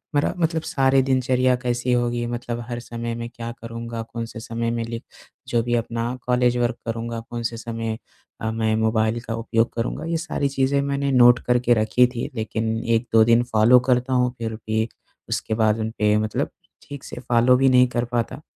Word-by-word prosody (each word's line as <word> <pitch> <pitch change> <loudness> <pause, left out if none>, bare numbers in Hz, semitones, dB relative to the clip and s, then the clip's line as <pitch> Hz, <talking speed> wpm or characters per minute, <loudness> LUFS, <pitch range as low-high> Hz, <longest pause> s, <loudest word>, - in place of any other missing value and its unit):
मेरा 145 - +2
मतलब 165 -1 0
सारी 135 -3 +2
दिनचर्या 130 -1 +2
कैसी 125 0 -1
होगी 120 -1 0
मतलब 120 0 -4
हर 120 0 -3
समय 115 -1 -5
में 115 0 -5
क्या 115 0 -7
करूँगा? 115 0 -6
कौन-से 115 0 -7
समय 115 +1 -3
में 115 0 -2
लिख 115 0 -6 0.4
जो 120 - +1
भी 120 0 0
अपना 115 +1 -2
कॉलेज 125 0 +2
वर्क 120 0 0
करूँगा, 115 0 -3
कौन 120 0 -5
से 115 0 -3
समय 115 -1 -4 0.4
अ 110 - -1
मैं 110 -1 0
मोबाइल 110 +1 +1
का 115 - -5
उपयोग 115 0 0
करूँगा? 115 +6 -3
ये 165 0 -1
सारी 160 -3 -1
चीज़ें 135 +1 +1
मैंने 140 0 -1
नोट 120 -1 +6
करके 125 0 +3
रखी 110 +2 +3
थी। 120 -1 -5
लेकिन 110 0 -2 0.2
1-2 115 -1 +3
दिन 115 +1 +4
फ़ॉलो 120 +1 +5
करता 125 +1 +2
हूँ, 125 -1 +2
फिर 115 -1 -4
भी 110 0 -1 0.4
उसके - - -2
बाद 110 0 +2
उनपे 110 -1 +1
मतलब 110 0 -1 0.4
ठीक 140 -2 -8
से - - -8
फ़ॉलो 120 +1 +4
भी 135 +1 +4
नहीं 125 0 +5
कर 120 -1 -1
पाता। 120 +3 -2
120 Hz, 190 wpm, -23 LUFS, 115-125 Hz, 0.4 s, नोट